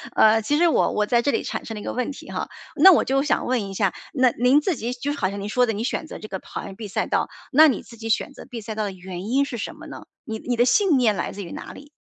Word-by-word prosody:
呃， 220 +1 +5
其 290 +7 +1
实 345 +2 +4
我 325 - +2
我 210 - +1
在 235 +2 +2
这 285 - 0
里 250 - 0
产 - - -4
生 225 - -6
了 210 - -6
一 - - -9
个 - - -4
问 250 +2 -2
题 275 - -10
哈， - - -4 0.3
那 380 - +8
我 335 - +4
就 270 +1 +1
想 290 - 0
问 240 -6 -1
一 195 - -7
下， 195 -2 +1 0.2
那 255 -3 +4
您 250 +6 +3
自 355 +2 0
己 240 0 -3
就 270 +3 -3
是 290 - -7
好 190 - +1
像 200 +1 -6
您 200 - -4
说 245 +3 +2
的， 225 - 0
你 215 +2 -3
选 290 +5 -2
择 - - -8
这 215 - -9
个 190 - -5
跑 - - -7
完 195 - -8
B 215 +1 -7
赛 195 - -1
道， - - 0 0.2
那 310 +3 +8
你 270 - 0
自 235 - -14
己 225 0 -7
选 235 - 0
择 - - -11
B 245 -4 -7
赛 220 +1 -6
道 215 0 -2
的 205 - -2
原 185 0 -8
因 275 +3 +3
是 245 -4 -6
什 - - -5
么 - - -12
呢？ - - -10 0.2
你 220 -1 -5
你 245 +2 -2
的 240 +1 +3
信 355 - +4
念 230 -5 +3
来 - - -3
自 200 - -6
于 170 - -9
哪 - - -7
里？ 285 +1 -13
235 Hz, 350 characters per minute, -23 LUFS, 210-275 Hz, 0.3 s, 那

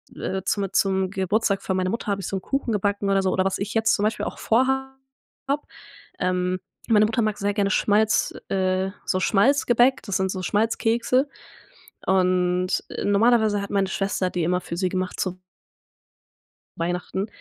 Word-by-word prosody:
äh, 190 -1 -3
zum 195 0 -1
zum 190 -1 +2
Geburtstag 200 +1 0
für 190 - -2
meine 185 0 0
Mutter 230 +3 -4
habe 200 -1 -1
ich 185 - -5
so - - -3
'n - - -6
Kuchen 270 +3 -2
gebacken 205 0 0
oder 195 0 +3
so. 190 -1 0
Oder 185 0 +1
was 195 - 0
ich 200 +1 -4
jetzt 225 -1 +3
zum 205 - -2
Beispiel 215 +1 0
auch - - -6
vorha 265 +3 +1 0.5
habe. 285 +2 0 0.6
Ähm, 180 0 0 0.3
meine 215 -2 +5
Mutter 225 +2 0
mag 215 -2 0
sehr 205 +1 -1
gerne 200 -1 +1
Schmalz, 215 +1 +2 0.2
äh 190 0 0
so 185 - 0
Schmalzgebäck, 245 +4 +3
das 200 -4 -1
sind 190 0 0
so 185 - -4
Schmalzkekse 230 +6 +1 0.8
und 180 -1 +2 0.4
normalerweise 215 0 +3
hat 200 - -6
meine 195 -1 +1
Schwester 195 -1 -1
die 180 -2 -2
immer 180 +2 +1
für 170 - -6
sie 185 0 0
gemacht 185 0 -3
zu 185 -1 -3 1.4
Weihnachten, 180 +3 -2
200 Hz, 170 wpm, -24 LUFS, 185-220 Hz, 1.4 s, meine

